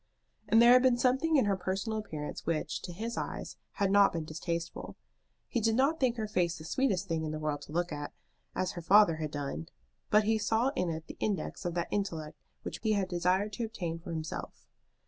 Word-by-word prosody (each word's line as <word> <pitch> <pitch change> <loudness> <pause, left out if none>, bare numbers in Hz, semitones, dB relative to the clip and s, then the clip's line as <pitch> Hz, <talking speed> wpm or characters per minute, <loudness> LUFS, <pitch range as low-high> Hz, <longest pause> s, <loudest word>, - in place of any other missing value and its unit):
And 225 - +6
there 235 +1 +8
had 255 - +7
been 255 -2 +4
something 265 +6 +2
in 265 - +5
her 200 -1 +2
personal 195 +4 -2
appearance 155 -8 -6
which, 165 -2 -1
to 180 - -6
his 225 +7 -4
eyes, - - -4 0.2
had 200 -1 +1
not 200 0 +6
been 165 -2 -3
distasteful. 170 +2 -4 0.5
He 235 - -1
did 225 +1 +2
not 280 +6 +2
think 245 -3 +2
her 220 -1 -2
face 175 -5 0
the 155 - -10
sweetest 200 - 0
thing 165 -2 -1
in 155 - -2
the 155 - -3
world 150 -1 -2
to - - -12
look 175 +2 -1
at, 145 0 -5 0.4
as 185 -1 0
her 175 - -6
father 185 -1 +6
had 155 -1 -3
done, 140 - -4 0.4
but 210 +1 +5
he 220 +1 +2
saw 225 +4 +2
in 180 -10 -1
it 160 0 -4
the - - -10
index 195 -2 -2
of 175 -1 -2
that 170 -1 -1
intellect 165 -7 -3 0.2
which - - -5
he 220 -1 +2
had 195 -3 0
desired 185 +4 +1
to 235 - -3
obtain 175 -7 -4
for 170 +1 -8
himself. 160 -1 -5
190 Hz, 220 wpm, -31 LUFS, 165-220 Hz, 0.5 s, there